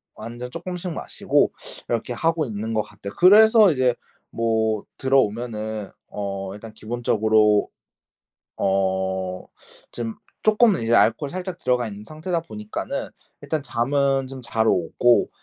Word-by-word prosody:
완전 120 +2 -7
쪼끔씩 180 +3 -5
마시고 - - 0 0.4
이렇게 120 +1 -1
하고 160 +4 0
있는 110 -1 -4
것 110 - +2
같아요. 100 -1 -10
그래서 215 +2 +7
이제 130 -4 +2 0.4
뭐 110 -2 0
들어오면은 110 -5 0 0.2
어 100 -2 -5
일단 110 +1 -11
기본적으로 110 -2 +2 0.9
어 95 -1 -1 0.5
좀 115 -2 -4 0.3
쪼끔은 215 -2 +4
이제 115 +1 +2
알코올이 120 +5 +3
살짝 185 -1 -5
들어가 125 -4 0
있는 105 0 -9
상태다 160 +6 -3
보니까는 105 -8 -5 0.3
일단 155 -3 -2
잠은 135 +2 0
좀 135 0 -8
잘 115 -2 0
오고 120 +2 +3
115 Hz, 275 characters per minute, -23 LUFS, 105-145 Hz, 0.9 s, 그래서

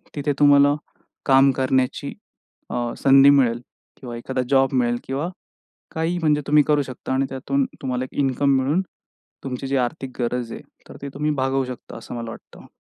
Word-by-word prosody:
तिथे 145 0 -1
तुम्हाला 145 0 +6 0.5
काम 135 0 +5
करण्याची 130 -1 0 0.6
अ, 120 -1 -2
संधी 135 0 +6
मिळेल 125 -4 +3 0.4
किंवा 120 -2 -8
एखादा 130 +2 -3
जॉब 135 0 +3
मिळेल 120 -2 +1
किंवा 140 +6 -3 0.7
काही 165 +2 -1
म्हणजे 150 -3 +1
तुम्ही 150 +1 +5
करू 150 -1 +3
शकता 130 -1 -6
आणि 135 +1 +1
त्यातून 135 +1 -1 0.2
तुम्हाला 130 -1 -2
एक - - -11
इन्कम 140 +1 +1
मिळून, 145 +8 +1 0.6
तुमची 130 0 -4
जी 135 +1 -1
आर्थिक 130 0 -3
गरज 120 -1 -2
आहे - - -7 0.3
तर - - -11
ती 140 - -4
तुम्ही 150 +2 -1
भागवू 135 0 0
शकता 125 -1 -9
असं 115 - -9
मला 115 -1 -5
वाटतं. - - -13
135 Hz, 170 wpm, -22 LUFS, 125-140 Hz, 0.7 s, तुम्हाला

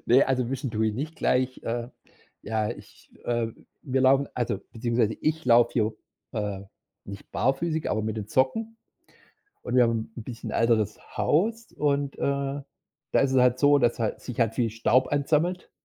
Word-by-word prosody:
Ne, 130 +4 +6
also 130 -2 0
Wischen 135 -1 -3
tue 110 0 +1
ich 105 - -3
nicht 155 +7 -4
gleich. 130 0 0
Äh, 120 +1 -3 0.5
ja, 110 -1 -1
ich - - -12
äh, 120 -1 0 0.4
wir 130 0 0
laufen 135 +1 +4
also, 120 -1 -1
beziehungsweise 115 -1 0
ich 160 +1 -1
laufe 120 -1 +6
hier, 110 -2 +1 0.4
äh, 105 -4 -3 0.4
nicht 100 0 -10
barfüßig, 155 +5 0
aber 110 - 0
mit 110 0 -3
den 105 -2 -4
Socken. 225 - 0 0.9
Und 125 - -3
wir 125 - +7
haben 115 -1 -1
'n 115 - -6
bisschen 120 0 -7
älteres 115 -3 +1 0.2
Haus. 225 +9 +1
Und, 145 -1 0
äh, - - -9 0.9
da - - +4
ist 135 - +2
es 130 - +2
halt 125 0 +4
so, 145 +1 +6
dass 120 -2 +1
hal 110 -2 -1
sich 125 -2 -7
halt 115 -2 +2
viel 120 -3 +1
Staub 120 +3 +2
ansammelt. 155 +5 0
125 Hz, 175 wpm, -26 LUFS, 115-140 Hz, 0.9 s, wir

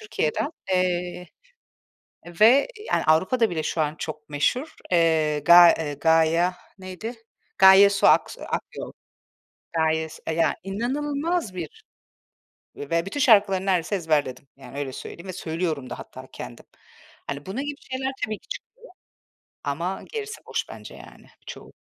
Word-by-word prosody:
Türkiye'den, 215 - -2 0.2
eee, 180 -1 -1 1.2
ve, 245 +6 +7 0.2
yani, - - +2
Avrupa'da 190 +9 +3
bile 160 -3 -3
şu 160 - -1
an 150 0 -1
çok 155 -1 -7
meşhur, 250 - -1 0.2
eee, 160 -3 +2
Ga 170 +3 +8
eee, 150 -2 -3
Gaya, 165 +4 +2 0.2
neydi? 185 +5 -7 0.4
Gaye 190 +1 +8
Su 200 -1 +2
Aks - - +3
eee, - - -10
Akyol. - - -5 0.8
Gaye 160 -1 +1
Su, 155 - -13
eee, 160 - 0
ya 165 0 +2
inanılmaz 280 - -2
bir 170 -4 -8 0.9
ve 165 +4 -2
bütün 195 +9 -5
şarkıları 200 -7 +4
neredeyse 185 0 +1
ezberledim. 150 -7 -1
Yani, 140 0 -12
öyle 140 -2 -3
söyleyeyim 170 +7 -9
ve 185 - -5
söylüyorum 160 -5 -3
da - - -7
hatta - - -11
kendim. - - -9 0.6
Hani, 140 +1 -5
bunun 200 +8 -4
gibi 290 -1 -5
şeyler 265 +1 -2
tabii 215 -1 -5
ki - - -27
çıkıyor. - - -7 1.0
Ama 170 +7 -3
gerisi 440 -1 -6
boş - - -3
bence - - -10
yani - - -15 0.2
çoğu. - - -10
175 Hz, 145 wpm, -24 LUFS, 160-210 Hz, 1.2 s, Ga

